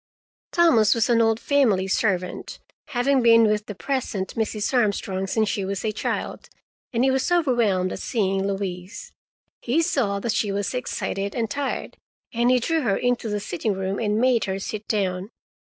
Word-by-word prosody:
Thomas 320 - +4
was 230 +2 +1
an 230 -1 +4
old 225 0 +2
family 230 -11 +2
servant, 185 -2 -1 0.3
having 270 -1 +1
been 230 -1 +6
with 210 -1 +1
the 205 - -6
present 220 -7 -3
Mrs. 220 +1 -2
Armstrong 200 -5 0
since 220 +2 +1
she 200 -1 -1
was 195 +2 -3
a 215 - +1
child, 210 - -4 0.4
and 240 -1 +1
he 265 - +4
was 265 +6 0
overwhelmed 235 - +2
at - - -5
seeing 195 -3 0
Louise. 190 -1 -5 0.5
He 295 +8 +1
saw 205 -10 0
that 225 +2 -1
she 215 -3 0
was 200 +3 -2
excited 200 -5 -3
and 225 -3 -2
tired, 280 +2 -3 0.4
and 240 +1 +2
he 255 0 +4
drew 325 +6 0
her 205 -8 +1
into 245 -2 0
the 210 0 -1
sitting 205 +1 -2
room 190 +1 -3
and 210 -2 0
made 250 -1 +3
her 190 0 -2
sit 210 +2 -6
down. 190 -2 -1
215 Hz, 175 wpm, -24 LUFS, 195-245 Hz, 0.5 s, been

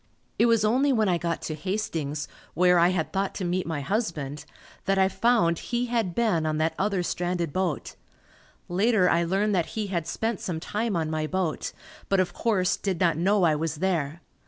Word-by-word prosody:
It 235 - +5
was 230 -2 +3
only 260 +6 +3
when 220 -5 +2
I 175 -2 +2
got 170 -1 -2
to 155 - -3
Hastings, 155 -4 -3 0.3
where 180 +1 +5
I 170 +1 +5
had 180 -4 -1
thought 195 0 -1
to 185 - -3
meet 180 +1 -1
my 160 -3 -2
husband 150 - -2 0.4
that 195 0 +2
I 190 0 +5
found 195 -5 +2
he 240 0 -2
had 230 -7 -1
been 215 -9 +2
on 155 0 0
that 160 +1 +1
other 195 -2 +1
stranded 175 -2 -2
boat. 185 -6 -2 0.7
Later, 195 +1 +3
I 170 - +3
learned 195 +5 +1
that 175 -4 +1
he 215 - 0
had 170 -2 -1
spent 225 +4 -2
some 185 -8 -3
time 210 +4 -2
on 160 -2 -1
my 155 -1 -1
boat, 185 -2 -2 0.4
but 195 - +3
of 185 - +1
course, 200 -6 +1
did 190 -4 -2
not 170 -3 +3
know 190 +4 +2
I 160 -3 +4
was 160 0 -2
there. 165 -2 -1
180 Hz, 200 wpm, -26 LUFS, 165-210 Hz, 0.7 s, It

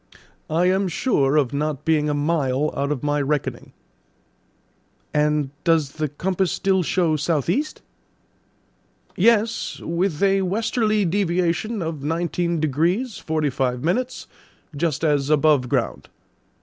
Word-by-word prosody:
"I 165 +3 +2
am 190 +1 +2
sure 155 - +1
of 140 -4 +1
not 150 0 -2
being 155 -2 +2
a 145 - 0
mile 145 -2 0
out 140 +1 -1
of 145 -3 -3
my 145 0 +1
reckoning." 145 0 -2 1.4
"And 150 -2 +1
does 160 -4 +2
the 155 0 -3
compass 185 +5 -1
still 190 -1 +1
show 170 -2 +1
south 150 -1 0
east?" 295 +10 -2 1.3
"Yes; 225 +2 +2
with 170 0 -1
a 195 0 +3
westerly 215 +2 +1
deviation 180 +3 0
of 160 -3 -4
nineteen 170 +2 -1
degrees 170 - 0
forty 155 -3 -1
five 125 -1 -1
minutes, 250 +10 -1 0.5
just 160 0 -1
as 145 -3 +1
above 150 -4 +3
ground. - - -2
160 Hz, 125 wpm, -22 LUFS, 145-190 Hz, 1.4 s, a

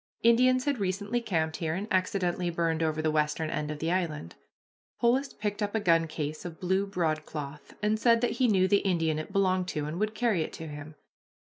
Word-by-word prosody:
Indians 255 +2 +4
had 285 -4 0
recently 205 +5 -1
camped 160 -7 -1
here, 160 -2 -2
and 200 +4 -4
accidentally 185 -1 0
burned 165 -1 0
over 155 -1 0
the 155 - +2
western 155 +1 0
end 150 0 -2
of 150 - -4
the 160 +3 -1
island. 160 - -2 0.7
Polis 260 +4 +2
picked 210 0 -4
up 205 +1 -1
a - - +3
gun 165 -4 +3
case 155 -1 -4
of 170 -2 -8
blue 190 +2 +1
broadcloth, 155 -5 -3
and 215 +1 +2
said 230 0 +4
that 245 - +1
he 250 - +5
knew 190 -4 +3
the 200 - +4
Indian 165 -6 0
it 155 - -6
belonged 185 -2 +1
to 150 -4 -2
and 155 +4 -4
would 215 +1 -1
carry 215 -6 +1
it - - -4
to 160 - -7
him. 150 +1 -8
180 Hz, 210 wpm, -29 LUFS, 155-210 Hz, 0.7 s, he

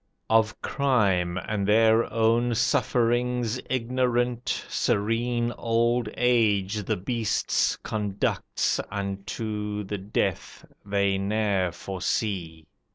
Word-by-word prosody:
"Of 110 -1 +3
crime, 100 -11 +1
and 100 +2 -2
their 110 +2 +4
own 115 +1 +2
sufferings 120 +1 +1
ignorant, 125 -1 0
Serene 120 +3 0
old 115 0 +1
age 110 -4 +2
the - - 0
beasts 115 +3 0
conducts 105 -2 -1
Unto 105 +1 -4
the 100 0 -4
death 100 +2 -3 0.2
they 100 -1 +1
ne'er 100 -2 0
foresee. 90 -3 -3
110 Hz, 90 wpm, -26 LUFS, 100-120 Hz, 0.2 s, their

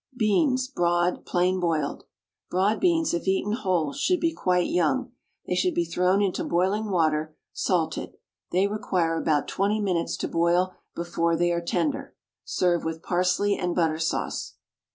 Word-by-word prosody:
BEANS, 255 +4 +2
BROAD, 175 -6 0
PLAIN 180 +1 +1
BOILED. 160 -5 -1 0.4
Broad 195 +4 +1
beans, 335 -3 +2
if 170 +2 -2
eaten 195 +2 +1
whole, 185 - 0
should 365 - +1
be 330 -1 +1
quite 180 - +1
young. 240 +10 0 0.3
They - - -2
should 180 0 +1
be 170 - +1
thrown 180 +4 +2
into 190 -2 -1
boiling 195 +5 0
water, 155 -4 +1 0.2
salted. - - -1 0.3
They 185 +2 +3
require 185 -5 0
about 155 -3 +1
twenty 205 +2 0
minutes 180 -5 -1
to - - -2
boil 175 +2 +1 0.2
before 170 -1 0
they 175 +1 +2
are 170 0 0
tender. 275 - -2 0.3
Serve 175 -2 +1
with 160 +1 -4
parsley 185 +3 +1
and 175 -1 -2
butter 160 -3 +1
sauce. 165 - -2
180 Hz, 155 wpm, -26 LUFS, 170-205 Hz, 0.4 s, They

